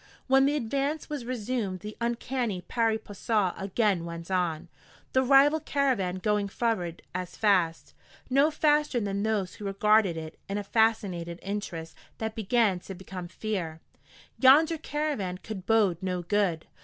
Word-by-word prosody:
When 270 +1 +5
the 290 - +1
advance 280 +4 -2
was 285 -5 -4
resumed 230 -5 -3
the 210 0 -7
uncanny 235 -3 -1
pari 225 +3 0
passu 205 -2 -1
again 195 -2 0
went 170 +1 -7
on, 175 -3 0 0.5
the 260 - +4
rival 275 +4 +5
caravan 265 - 0
going 205 +1 0
forward 200 -6 -2
as 180 0 -5
fast, 180 -6 +1 0.3
no 275 +3 +4
faster 300 -4 +2
than 200 -2 -2
those 210 -4 -1
who 210 - -9
regarded 200 -2 +3
it 160 0 -7
in 200 - -1
a 205 - -2
fascinated 200 -6 +1
interest 190 -5 -5 0.2
that 220 0 -3
began 220 -3 +2
to 190 +2 -9
become 185 -1 -7
fear. 180 -4 -4 0.6
Yonder 305 +5 +6
caravan 290 - -2
could 195 -1 -8
bode 205 -6 +3
no 180 -2 -2
good. 180 -3 0
210 Hz, 145 wpm, -28 LUFS, 185-245 Hz, 0.6 s, Yonder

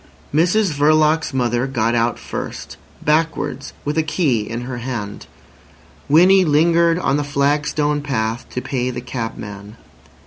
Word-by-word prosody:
Mrs 180 +5 +3
Verloc's 155 +2 +3
mother 120 -1 0
got 115 -3 0
out 120 0 +1
first, - - -6 0.3
backwards, 150 -3 0
with 150 +2 0
a - - +4
key 155 - 0
in 115 +1 -4
her 125 0 -5
hand. 115 -5 -5 0.8
Winnie 185 +6 +6
lingered 165 +2 +3
on 160 -5 +1
the 145 - -1
flagstone 145 +1 0
path 115 -5 -2
to 125 - -5
pay 125 -2 -2
the 125 -1 -4
cabman. 110 -4 -7
140 Hz, 135 wpm, -19 LUFS, 120-155 Hz, 0.8 s, Winnie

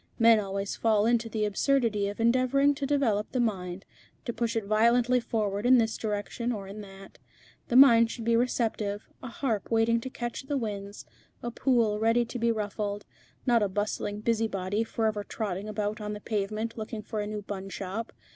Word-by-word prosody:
Men 230 -2 +6
always 195 -1 -3
fall 215 -2 +2
into 230 0 +2
the 215 -1 -1
absurdity 215 -1 +1
of 205 +2 -6
endeavouring 255 +4 +3
to 280 -1 -3
develop 240 -8 +1
the 255 - -1
mind, 190 -5 -2 0.4
to 235 - -2
push 230 +1 -2
it 225 - 0
violently 235 +4 +3
forward 210 -4 -2
in 255 +1 +6
this 225 -2 +1
direction 215 +3 -3
or 200 -4 -5
in 205 +2 -8
that. 195 -1 -13 0.5
The 240 - -1
mind 235 -4 +8
should 230 -1 -6
be 230 0 +3
receptive, 225 -4 -1
a 255 - -6
harp 230 -3 -2
waiting 230 0 +2
to 260 - -5
catch 240 -2 -5
the 285 - 0
winds, 205 -4 -5 0.4
a 240 - -3
pool 230 -5 +2
ready 230 +2 +3
to 245 +1 -6
be 235 0 +2
ruffled, 205 -1 -3 0.4
not 240 -2 +4
a 205 - +1
bustling 205 +1 -2
busybody, 215 -3 0
forever 220 -2 -1
trotting 205 -1 -4
about 210 +1 -3
on 210 0 -4
the 210 - -6
pavement 215 +2 -3
looking 215 0 -5
for 215 - -4
a 205 - -3
new 210 -1 -5
bun 195 -1 -6
shop. 195 +4 -5
220 Hz, 185 wpm, -28 LUFS, 205-235 Hz, 0.5 s, mind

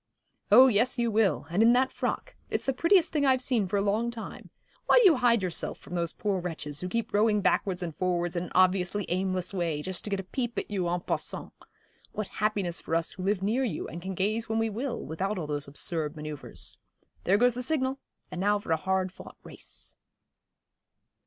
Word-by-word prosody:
'Oh 250 +5 +10
yes, 250 +1 +3
you 235 -1 +1
will, 205 -9 +2
and 185 +5 +2
in 230 +1 +6
that 260 +1 +3
frock. - - -3
It's - - -2
the 270 - +1
prettiest 335 +5 +4
thing 300 -2 +1
I've 260 -2 +4
seen 245 -6 +1
for 200 +3 0
a 200 - +1
long 215 +4 +1
time. 235 -2 -8 0.4
Why - - +6
do - - +6
you 335 -7 +7
hide 235 -4 +3
yourself 180 -2 -2
from - - -12
those 170 -2 0
poor 200 -3 -1
wretches, 150 -4 -4
who 180 - -3
keep 230 +2 -2
rowing 210 0 +3
backwards 185 -1 +1
and 165 -3 -5
forwards 175 -1 -1
in 175 +1 -1
an - - -11
obviously 185 +1 +3
aimless 185 0 -1
way, 165 -5 -1
just 185 +1 -4
to - - -3
get 200 -1 -1
a - - -4
peep 240 +5 -4
at - - -3
you 185 -4 0
en 175 0 -1
passant? - - -3 0.6
What 215 -2 -4
happiness 200 -5 0
for 165 - -2
us 165 0 +1
who 185 - -8
live 195 0 0
near 230 +7 +1
you, 210 -12 -3
and 170 - -7
can 190 +1 -5
gaze 215 +5 0
when 220 - 0
we 225 0 +1
will, 240 +4 -3
without 190 +6 -2
all 170 - -3
those 145 -1 -2
absurd 150 +1 -3
manoeuvres. 150 -2 -8 0.5
There 195 +3 +4
goes 245 +2 +4
the 250 - -4
signal 265 -1 0 0.3
and 180 - -4
now 205 +1 +3
for 200 -4 -6
a 160 - +4
hard 190 +2 0
fought - - -12
race.' - - -8
195 Hz, 215 wpm, -28 LUFS, 175-230 Hz, 0.6 s, Oh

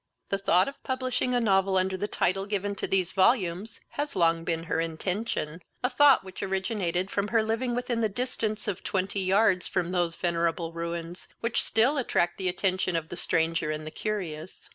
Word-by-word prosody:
The 195 - 0
thought 185 -2 +4
of 275 - -7
publishing 255 -1 -1
a - - +3
novel, 195 -3 +3
under 190 0 +1
the 205 +3 -2
title 195 0 0
given 205 -1 -1
to - - -2
these 190 -2 +1
volumes, 190 0 +1
has 290 0 -3
long 165 -2 +3
been 165 0 -1
her 165 - -1
intention, 165 0 -2 0.2
a 250 - +1
thought 285 +1 +6
which 190 -1 -9
originated 190 -2 -1
from 200 0 0
her 225 0 +2
living 230 +3 -1
within 245 -1 -1
the 220 - +2
distance 220 -1 -3
of 195 -3 -3
twenty 195 +1 -1
yards 190 -1 +3
from 180 -1 -1
those 175 -2 0
venerable 170 -1 -1
ruins, 170 +1 -5
which 230 0 +1
still 260 +6 +2
attract 175 -9 0
the 185 -1 +1
attention 185 -1 0
of 165 0 -2
the - - -5
stranger 165 -2 +1
and 155 0 -3
the 155 - -6
curious. 185 -5 -5
190 Hz, 185 wpm, -28 LUFS, 170-220 Hz, 0.2 s, thought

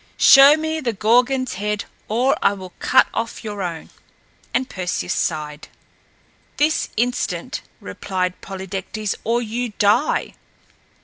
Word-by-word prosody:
"Show 280 +2 +8
me 315 0 -2
the 240 -5 -1
Gorgon's 245 +5 +2
head 210 0 -2 0.2
or 245 +5 +2
I - - +3
will 185 -2 -10
cut - - +4
off 230 +1 -4
your 205 -2 -5
own!" 170 -3 -5 0.6
And 255 0 0
Perseus 180 -6 -3
sighed. 150 -2 -3 0.9
"This 305 +2 +1
instant," 245 +2 -2 0.2
repeated 185 -2 -4
Polydectes, 195 +2 -5
"or 235 +2 0
you 235 +1 -4
die!" 210 +9 +2
215 Hz, 120 wpm, -21 LUFS, 190-250 Hz, 0.9 s, Show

